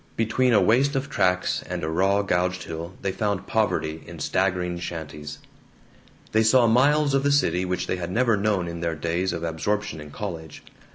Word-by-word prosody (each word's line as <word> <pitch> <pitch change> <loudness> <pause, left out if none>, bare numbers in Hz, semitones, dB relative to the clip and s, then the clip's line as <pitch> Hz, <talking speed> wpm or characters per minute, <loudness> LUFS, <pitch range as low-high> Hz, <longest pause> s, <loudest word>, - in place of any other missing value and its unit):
Between 125 +3 +1
a 110 - +5
waste 125 +9 +3
of 135 +2 -2
tracks 90 -6 +1
and - - -4
a - - -1
raw 95 +5 +2
gouged 90 -1 0
hill 80 +2 -6
they 95 - 0
found 100 0 -2
poverty 80 -7 -1
in - - -9
staggering 90 -2 -1
shanties. 75 -4 -6 0.9
They 110 - +3
saw 120 +2 +5
miles 140 +5 +3
of 135 - +3
the 145 +1 +2
city 95 -11 +2
which 90 0 -2
they 90 - -2
had 85 -1 -4
never 115 +3 +2
known 100 -3 0
in 85 0 -5
their 85 -1 -1
days 85 +4 -1
of 85 - -4
absorption 85 +1 -2
in 75 - -10
college. 80 -3 -7
95 Hz, 185 wpm, -24 LUFS, 85-110 Hz, 0.9 s, a